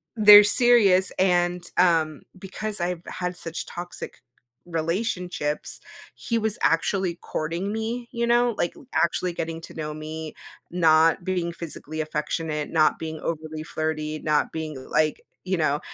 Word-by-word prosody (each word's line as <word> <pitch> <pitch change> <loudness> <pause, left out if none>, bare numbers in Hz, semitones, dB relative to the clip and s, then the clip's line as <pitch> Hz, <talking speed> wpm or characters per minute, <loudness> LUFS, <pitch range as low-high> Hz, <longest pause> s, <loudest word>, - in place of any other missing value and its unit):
they're 210 -2 +10
serious, 205 -4 +4
and, 175 -1 +2
um, 165 -4 +3 0.2
because 210 +2 -4
I've 175 -1 -2
had 180 0 -4
such 165 -1 -5
toxic 175 0 -7 0.5
relationships, 170 -2 -2 0.4
he 230 - -2
was 220 -2 -1
actually 175 +1 +1
courting 170 +6 -3
me, 230 +2 -3
you 235 -1 -1
know, 240 -1 +3
like, 175 - -1 0.2
actually 175 +1 +1
getting 165 -1 -4
to - - -11
know 150 -1 -5
me, 155 +1 -7 0.3
not 165 0 +4
being 180 -2 -1
physically 155 -2 -6
affectionate, 150 0 -3
not 155 -2 +3
being 160 -1 -5
overly 155 -1 -4
flirty, 155 -1 -3
not 150 -1 +1
being, 155 -2 -5
like, 155 -1 +1 0.2
you 185 0 -1
know, 150 -2 +1
170 Hz, 135 wpm, -25 LUFS, 155-190 Hz, 0.5 s, they're